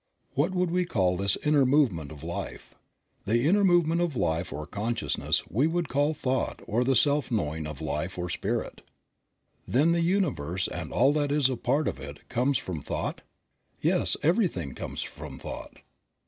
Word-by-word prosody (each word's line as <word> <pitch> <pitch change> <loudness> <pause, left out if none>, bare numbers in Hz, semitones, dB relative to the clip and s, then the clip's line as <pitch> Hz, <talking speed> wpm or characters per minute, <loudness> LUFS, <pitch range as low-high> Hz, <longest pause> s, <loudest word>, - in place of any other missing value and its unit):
What 145 +6 +2
would 180 -1 +1
we 180 +1 +2
call 95 - +1
this 100 +2 +1
inner 150 -2 +4
movement 125 - +2
of 75 -1 -10
Life? 85 +1 -6 0.5
The 120 +6 +2
inner 200 +4 +4
movement 175 -2 +4
of 170 -5 0
Life 80 -5 0
or 75 - -5
consciousness 110 +7 -1
we 130 +9 +2
would 170 -1 -1
call 145 +4 +1
thought 130 -2 -1
or 115 +4 +1
the 135 +1 +2
self 145 +3 +3
knowing 80 - -1
of 75 -1 -7
Life 75 +4 -3
or 90 0 -2
Spirit. 85 - -3 0.9
Then 150 +7 +3
the 170 0 +2
universe 130 - 0
and 90 -4 -5
all 135 +3 +4
that 145 -1 0
is 145 -3 +3
a - - -1
part 140 +6 0
of 65 - -2
it 70 +1 -10
comes 125 +3 +2
from 85 -8 -5
thought? - - -3 0.6
Yes, - - +2
everything 155 - +1
comes - - -5
from 70 -2 -8
thought. - - -8
125 Hz, 175 wpm, -28 LUFS, -, 0.9 s, inner